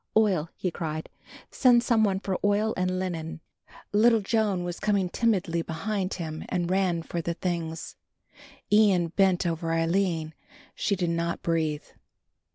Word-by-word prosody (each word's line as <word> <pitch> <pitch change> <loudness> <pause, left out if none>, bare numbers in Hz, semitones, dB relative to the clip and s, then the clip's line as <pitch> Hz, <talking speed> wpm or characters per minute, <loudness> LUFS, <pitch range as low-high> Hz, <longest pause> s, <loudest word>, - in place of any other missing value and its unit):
"Oil," 190 -8 +2
he 180 - -2
cried, 155 -1 -4 0.4
"send 245 -3 +5
some 230 -3 +3
one 195 -2 +1
for 190 -2 -2
oil 205 +2 +2
and 185 0 0
linen." 165 -4 -4 0.5
Little 225 +1 +5
Joan 205 -3 0
was 175 0 -5
coming 200 -3 +1
timidly 180 -7 +1
behind 190 +4 -3
and 170 +2 -3
ran 185 -3 +1
for 170 +1 -4
the 170 +1 -3
things. 165 -2 -4 0.8
Ian 195 -5 +4
bent 185 0 +2
over 165 -1 -1
Aline; 165 -1 0 0.4
she 200 - 0
did 175 -2 -1
not 170 0 -2
breathe. 160 -3 0
180 Hz, 140 wpm, -27 LUFS, 165-205 Hz, 0.8 s, send